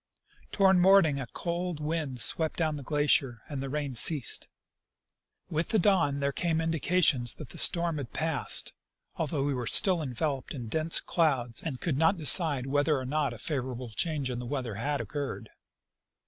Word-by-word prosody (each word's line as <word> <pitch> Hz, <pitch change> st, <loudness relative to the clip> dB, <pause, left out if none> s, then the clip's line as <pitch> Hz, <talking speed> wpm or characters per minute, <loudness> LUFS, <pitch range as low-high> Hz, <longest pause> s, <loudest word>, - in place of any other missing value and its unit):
ToAvard 190 Hz, -2 st, +3 dB
morning 175 Hz, -6 st, +4 dB
a 130 Hz, -, -6 dB
cold 175 Hz, +3 st, -4 dB
wind 150 Hz, -4 st, -4 dB
swept 160 Hz, +5 st, +4 dB
down 155 Hz, -2 st, -1 dB
the 145 Hz, -, -7 dB
glacier 140 Hz, -5 st, 0 dB
and 145 Hz, -4 st, -6 dB
the 135 Hz, -, -5 dB
rain 145 Hz, -1 st, -4 dB
ceased. 135 Hz, +2 st, +2 dB, 1.0 s
With 165 Hz, -1 st, -3 dB
the 220 Hz, -, +1 dB
dawn 170 Hz, -8 st, +1 dB
there 140 Hz, 0 st, 0 dB
came 165 Hz, +2 st, -1 dB
indications 160 Hz, -6 st, +1 dB
that 150 Hz, -, -11 dB
the -, -, -8 dB
storm 170 Hz, -3 st, +4 dB
had 130 Hz, -5 st, -7 dB
passed, 155 Hz, -9 st, +1 dB, 0.4 s
although 150 Hz, -3 st, -2 dB
we 145 Hz, 0 st, -1 dB
were 125 Hz, -3 st, -4 dB
still 185 Hz, -, +4 dB
enveloped 135 Hz, 0 st, -4 dB
in 120 Hz, -4 st, -7 dB
dense 160 Hz, +6 st, +2 dB
clouds 130 Hz, -9 st, -1 dB
and 140 Hz, -6 st, -6 dB
could 155 Hz, -6 st, -2 dB
not 165 Hz, +4 st, +2 dB
decide 150 Hz, -3 st, +3 dB
whether 145 Hz, +2 st, +1 dB
or 130 Hz, -, -5 dB
not 145 Hz, 0 st, -1 dB
a 120 Hz, -, -9 dB
favorable 125 Hz, -2 st, -4 dB
change 145 Hz, +2 st, -2 dB
in 120 Hz, -, -5 dB
the 125 Hz, -, -7 dB
weather 130 Hz, -4 st, -4 dB
had 140 Hz, +7 st, -3 dB
occurred. 145 Hz, -2 st, -6 dB
145 Hz, 175 wpm, -28 LUFS, 130-165 Hz, 1.0 s, morning